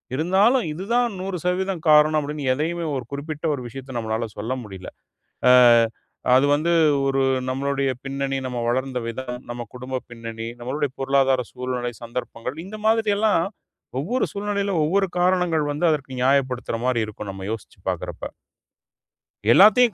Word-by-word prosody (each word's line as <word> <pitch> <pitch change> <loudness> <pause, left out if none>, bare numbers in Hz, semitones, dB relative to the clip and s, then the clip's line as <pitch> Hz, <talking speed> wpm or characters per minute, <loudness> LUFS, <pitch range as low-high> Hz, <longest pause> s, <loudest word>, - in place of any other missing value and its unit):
இருந்தாலும், 195 - +3
இது 185 +5 -6
தான் 245 0 +4
100% 185 -1 -2
காரணம், 155 0 +6
அப்டினு 145 -1 -5
எதையுமே 165 +4 -2
ஒரு 125 - -5
குறிப்பிட்ட 155 +3 -5
ஒரு 130 -3 -4
விஷயத்த 130 +1 -7
நம்மால 110 0 -2
சொல்ல 115 +5 -2
முடியல. 95 -3 -9 0.6
ஆ - - +7 0.9
அது 135 +2 +4
வந்து, 165 +4 +1 0.4
ஒரு 135 0 +1 0.3
நம்மளுடைய 140 0 0
பின்னணி, 135 0 -2
நம்ம 125 -1 -3
வளர்ந்த 130 0 -1
விதம், 125 +1 -5
நம்ம 120 -1 -5
குடும்ப 130 +1 -5
பின்னணி, 115 -1 -6
நம்மளுடைய 140 +3 -2
பொருளாதார 135 -2 +2
சூழ்நிலை, 125 -1 -3
சந்தர்ப்பங்கள் 125 +3 -5
இந்த 215 +2 -8
மாதிரியெல்லாம், 215 -4 +3 0.6
ஒவ்வொரு 240 - 0
சூழ்நிலையில 200 -1 -1
ஒவ்வொரு 195 +4 +2
காரணங்கள் 180 -4 +2
வந்து, 155 +4 0
அதற்கு 140 -3 -3
நியாயப்படுத்துற 130 -3 +1
மாதிரி 120 -3 +1
இருக்கும், 105 -1 -7
நம்ம 95 0 -7
யோசிச்சு 115 - -8
பார்க்கறப்ப. - - -5 1.3
எல்லாத்தையும் 215 - +7
140 Hz, 135 wpm, -23 LUFS, 125-180 Hz, 1.3 s, ஆ